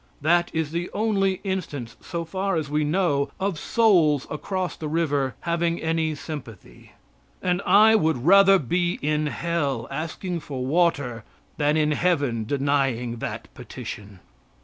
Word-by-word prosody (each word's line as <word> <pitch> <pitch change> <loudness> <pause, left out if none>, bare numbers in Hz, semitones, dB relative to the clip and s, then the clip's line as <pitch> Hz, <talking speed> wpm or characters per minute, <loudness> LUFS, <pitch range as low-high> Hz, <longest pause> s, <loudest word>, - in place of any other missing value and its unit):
That 175 +3 +3
is 160 -2 -2
the 170 +2 -3
only 195 -3 0
instance, 150 - -4
so 170 -1 -4
far 190 +3 -2
as 155 -3 -2
we 150 +1 +1
know, 150 -3 +1
of 190 -4 -1
souls 170 - +3
across 185 +4 -3
the 155 - -6
river 145 -4 0
having 170 0 0
any 160 -1 -1
sympathy. 120 - -10 0.5
And 180 0 0
I 220 +2 +7
would 160 - +1
rather 195 +2 +7
be 175 +3 -1
in 150 +1 +1
hell, 145 -7 -2
asking 170 +3 -4
for 135 -4 -5
water, 140 -7 +1 0.3
than 150 +1 +2
in 150 -1 +2
heaven 145 -9 0
denying 135 -3 0
that - - -5
petition. 100 -3 -9
160 Hz, 140 wpm, -24 LUFS, 140-180 Hz, 0.5 s, I